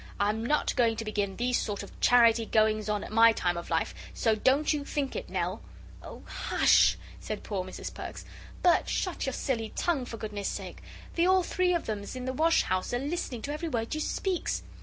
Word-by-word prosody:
I'm 210 +2 +1
not 295 +5 +1
going 235 -4 +3
to 225 - -5
begin 205 -2 -2
these 245 +1 +1
sort 205 -2 -3
of 200 - -13
charity 230 -2 +5
goings 215 -1 +2
on 210 -1 0
at - - -8
my 225 +1 +6
time 175 -4 0
of 170 - -6
life, 165 -1 0 0.2
so 225 - +2
don't 265 +8 +2
you 295 -1 -2
think 280 -1 -3
it, - - -5
Nell." - - -2 0.4
"Oh, - - -10
hush!" - - +3 0.2
said 215 - -5
poor 195 -3 -3
Mrs 185 - -7
Perks; - - -7 0.4
"Bert, 355 -1 +4
shut 365 -7 -2
your 265 - -1
silly 230 -5 -2
tongue, 310 -8 0
for 230 - -7
goodness' 210 -2 -4
sake. - - -6 0.3
The 340 +1 +2
all 375 0 +4
three 360 0 +1
of 340 - -2
'ems 210 +1 -4
in 255 -1 -5
the 260 - -2
wash 325 +5 +3
house 185 +5 -1
a - - +2
listening 275 -4 -3
to 290 - -3
every 320 +2 -3
word 230 -4 -2
you 310 - -2
speaks." 370 +2 -1
235 Hz, 210 wpm, -29 LUFS, 215-295 Hz, 0.4 s, my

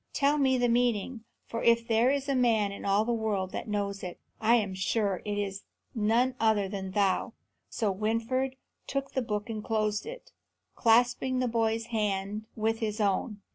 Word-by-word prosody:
Tell 290 +1 +2
me 265 -2 +3
the 245 -1 +2
meaning, 235 -1 0 0.2
for 230 - -4
if 230 0 +3
there 230 +2 +3
is 280 0 0
a 275 - +1
man 230 -5 +2
in 200 - -8
all 200 +2 +3
the 240 - 0
world 210 -5 -1
that - - -5
knows 200 -1 -2
it, 180 -1 -7 0.2
I 225 +2 +4
am 205 -5 0
sure 190 +1 0
it 205 -1 -2
is 200 -1 -3 0.3
none 235 +3 +2
other 220 -3 +2
than 190 -1 -5
thou." 195 -2 +1 0.4
So 215 -4 0
Winfried 230 +6 -1 0.3
took 275 0 -3
the 260 - 0
book 210 -3 -3
and 215 -2 -5
closed 215 -2 -1
it, - - -9 0.4
clasping 245 +3 +3
the 255 0 +1
boy's 225 -1 0
hand 210 0 -1
with 225 +1 0
his 215 -1 -2
own. 205 +1 0
220 Hz, 180 wpm, -29 LUFS, 205-240 Hz, 0.4 s, I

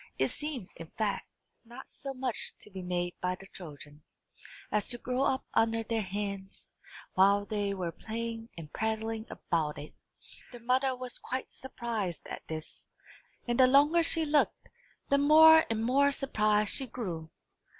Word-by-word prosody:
It - - +2
seemed, 280 -10 -4
in 165 -1 -9
fact, 215 -2 -1 0.4
not 240 +3 -11
so 275 0 -7
much 255 -2 0
to 210 - -11
be 190 -1 -6
made 175 -1 -2
by 180 0 0
the 195 - -13
children, 150 -5 -11 0.7
as 210 -1 +1
to 240 - +1
grow 250 +2 -2
up 265 -1 +1
under 225 0 +2
their 225 0 -1
hands, 200 0 -5 0.4
while 200 +2 +4
they 205 -1 -1
were 180 -3 -3
playing 225 +4 -5
and 155 -3 -9
prattling 220 +1 -2
about 155 -3 -2
it. 150 - -9 0.6
Their 240 -1 -10
mother 260 +2 +2
was 250 0 -2
quite 255 +1 -4
surprised 230 -9 -4
at - - -6
this; 155 -1 -8 0.6
and 240 +1 0
the 255 - +8
longer 290 +6 +5
she 330 -1 +2
looked, 295 0 +1 0.4
the 280 - +4
more 320 +2 +8
and 225 -1 -1
more 280 +3 +4
surprised 215 -6 +1
she 265 - -1
grew. 175 -10 -5
225 Hz, 160 wpm, -30 LUFS, 195-260 Hz, 0.7 s, the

